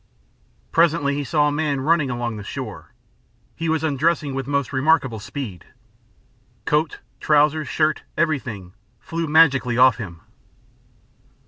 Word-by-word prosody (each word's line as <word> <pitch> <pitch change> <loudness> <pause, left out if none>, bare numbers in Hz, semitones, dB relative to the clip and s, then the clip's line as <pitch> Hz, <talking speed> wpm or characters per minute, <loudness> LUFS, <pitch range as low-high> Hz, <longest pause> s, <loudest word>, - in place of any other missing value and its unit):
Presently 165 -4 +2
he 145 +1 -2
saw 150 +3 +2
a - - +1
man 145 -2 -1
running 155 0 +2
along 120 -2 -3
the 105 - -7
shore. - - -7 0.6
He 165 0 -3
was 160 0 0
undressing 150 0 0
with 135 -1 -4
most 140 -1 -1
remarkable 130 -4 +2
speed. 105 - -7 1.0
Coat, 150 0 0 0.2
trousers, 150 0 +2
shirt, 155 -1 0 0.2
everything 120 - -2 0.3
flew 165 0 -4
magically 140 -6 +4
off 125 -2 +6
him. 90 -8 -8
145 Hz, 125 wpm, -22 LUFS, 125-155 Hz, 1.0 s, off